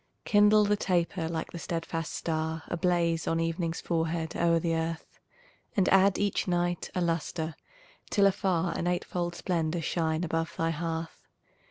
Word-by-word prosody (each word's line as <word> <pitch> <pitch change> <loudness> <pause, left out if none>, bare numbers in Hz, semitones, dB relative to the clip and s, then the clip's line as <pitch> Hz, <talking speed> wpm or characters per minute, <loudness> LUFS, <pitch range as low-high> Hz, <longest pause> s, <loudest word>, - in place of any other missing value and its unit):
Kindle 210 0 +5
the 210 +1 +3
taper 175 -3 0
like 165 -1 -3
the 170 - -6
steadfast 165 -1 -3
star 160 0 -2
Ablaze 170 -1 +1
on 165 - +1
evening's 165 0 -1
forehead 165 -1 -1
o'er 170 -1 +3
the 165 0 0
earth, 165 0 -3 0.6
And 195 - +4
add 195 0 +5
each 205 -1 0
night 175 -1 0
a 180 - +1
lustre 165 -1 -1 0.6
till 200 - +4
afar 185 -4 +1
An 175 - -1
eightfold 175 0 -1
splendor 170 -2 -1
shine 160 0 0
above 165 -1 -2
thy 165 0 +1
hearth. 165 0 -4
170 Hz, 150 wpm, -29 LUFS, 165-180 Hz, 0.6 s, Kindle